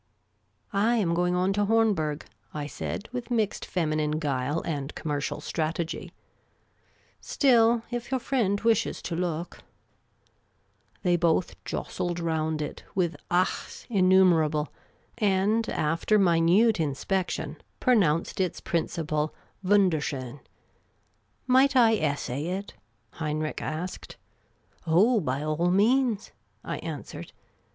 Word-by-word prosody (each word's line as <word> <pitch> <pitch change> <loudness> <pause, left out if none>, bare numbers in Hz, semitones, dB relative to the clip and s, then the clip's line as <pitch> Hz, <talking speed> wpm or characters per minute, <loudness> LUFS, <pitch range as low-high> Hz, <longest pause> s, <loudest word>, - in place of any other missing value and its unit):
" - - -39 0.2
I 240 - +3
am 190 -7 +1
going 180 +1 +1
on 185 +2 +1
to 205 +1 +1
Hornberg," 200 -10 +1 0.3
I 150 -1 -3
said, 175 +7 -5
with 245 -1 -5
mixed 220 -4 0
feminine 155 -3 0
guile 145 0 -1
and 145 -3 -4
commercial 145 -2 -3
strategy; 165 +1 -3 0.6
" - - -37
still, 235 -4 +4
if 240 -1 -4
your 260 -1 0
friend 225 -6 0
wishes 225 -2 +1
to 170 - -3
look 170 -1 -3 0.7
". - - -40
They 175 -2 +3
both 170 +1 0
jostled 175 -1 -3
round 160 -2 -1
it, 150 - -7
with 175 -3 +1
achs 180 +1 -1
innumerable, 180 -6 +3 0.5
and, 210 +2 +2
after 165 +7 +1
minute 180 +4 +4
inspection, 160 +1 -2 0.2
pronounced 190 -8 +2
its 180 -3 -1
principle 155 -2 -2 0.3
luundcr 185 -5 +3
schon. 130 -2 -5 0.6
" - - -43 0.2
Might 260 +2 +4
I 230 -3 +6
essay 145 -2 -2
it? 190 +3 -4 0.2
" - - -44
Heinrich 155 0 -2
asked. 170 +4 -5 0.4
" - - -36
Oh, 210 +9 +4
by 140 -4 -2
all 155 +3 0
means," 225 +3 +2 0.3
I - - -4
answered. - - -7
175 Hz, 125 wpm, -27 LUFS, 155-210 Hz, 0.7 s, I